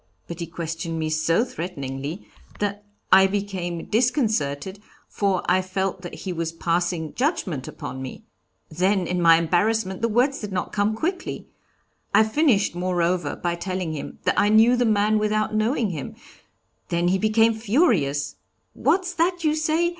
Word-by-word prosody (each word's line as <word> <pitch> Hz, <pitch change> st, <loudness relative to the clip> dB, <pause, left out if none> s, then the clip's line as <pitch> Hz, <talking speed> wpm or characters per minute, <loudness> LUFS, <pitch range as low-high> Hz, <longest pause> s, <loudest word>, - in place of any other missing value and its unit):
But 170 Hz, 0 st, -7 dB
he 170 Hz, -, -4 dB
questioned 165 Hz, 0 st, -4 dB
me 155 Hz, -1 st, -2 dB
so 165 Hz, +8 st, +2 dB
threateningly 150 Hz, -, -6 dB, 0.3 s
that 205 Hz, 0 st, -3 dB, 0.3 s
I 190 Hz, +1 st, +8 dB
became 190 Hz, -4 st, -3 dB
disconcerted, 210 Hz, -, 0 dB, 0.3 s
for 195 Hz, -3 st, 0 dB
I 185 Hz, +1 st, +3 dB
felt 190 Hz, 0 st, -2 dB
that 175 Hz, -, -7 dB
he 185 Hz, -, -4 dB
was 165 Hz, -1 st, -2 dB
passing 170 Hz, -1 st, -1 dB
judgment 205 Hz, -, -1 dB
upon 130 Hz, -, -7 dB
me. 130 Hz, -, -8 dB, 0.4 s
Then 185 Hz, +3 st, +1 dB
in 180 Hz, +1 st, -1 dB
my 165 Hz, -1 st, +7 dB
embarrassment 190 Hz, +4 st, 0 dB
the 230 Hz, -, +2 dB
words 255 Hz, +5 st, +2 dB
did 210 Hz, -2 st, -6 dB
not 185 Hz, -1 st, -3 dB
come 210 Hz, +1 st, +1 dB
quickly. 360 Hz, -, -3 dB, 0.7 s
I -, -, +7 dB
finished, 220 Hz, -, +2 dB
moreover, 175 Hz, -2 st, 0 dB
by 175 Hz, -1 st, -2 dB
telling 180 Hz, -1 st, -3 dB
him 150 Hz, -, -6 dB
that -, -, +2 dB
I 205 Hz, -, +3 dB
knew 225 Hz, +3 st, +6 dB
the 245 Hz, 0 st, +2 dB
man 215 Hz, 0 st, +3 dB
without 215 Hz, 0 st, 0 dB
knowing 215 Hz, 0 st, +1 dB
him; 150 Hz, -5 st, -6 dB, 0.7 s
then 170 Hz, +1 st, +1 dB
he 190 Hz, +1 st, +2 dB
became 225 Hz, +2 st, +3 dB
furious: 215 Hz, -, +1 dB, 0.4 s
'What's 365 Hz, -1 st, +1 dB
that 350 Hz, 0 st, 0 dB
you 305 Hz, -1 st, +3 dB
say? 315 Hz, +2 st, +1 dB
190 Hz, 155 wpm, -24 LUFS, 170-220 Hz, 0.7 s, I